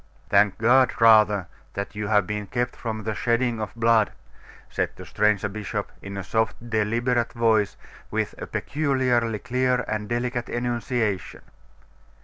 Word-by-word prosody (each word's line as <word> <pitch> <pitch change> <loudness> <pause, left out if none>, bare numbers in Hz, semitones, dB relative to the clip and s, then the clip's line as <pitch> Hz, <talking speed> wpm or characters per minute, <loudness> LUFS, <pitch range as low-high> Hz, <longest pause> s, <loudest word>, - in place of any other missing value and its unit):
'Thank 100 -1 +4
God 125 +3 +4
rather 105 -4 +6 0.3
that 100 0 -4
you 105 0 -4
have 105 -2 +3
been 105 +1 -4
kept 120 +3 -2
from 110 -2 -5
the 110 +1 -2
shedding 115 0 0
of 110 - -5
blood,' 115 -2 +3 0.6
said - - -1
the - - -10
stranger 105 -2 +1
bishop, 105 0 -4
in 100 0 -7
a 100 - -4
soft, 110 +3 0 0.2
deliberate 115 +2 +1
voice, 110 -4 +2 0.3
with - - -2
a - - -6
peculiarly 130 -6 0
clear 125 +2 0
and 105 -1 -3
delicate 120 0 -2
enunciation. 120 -4 -2
115 Hz, 140 wpm, -24 LUFS, 105-120 Hz, 0.6 s, rather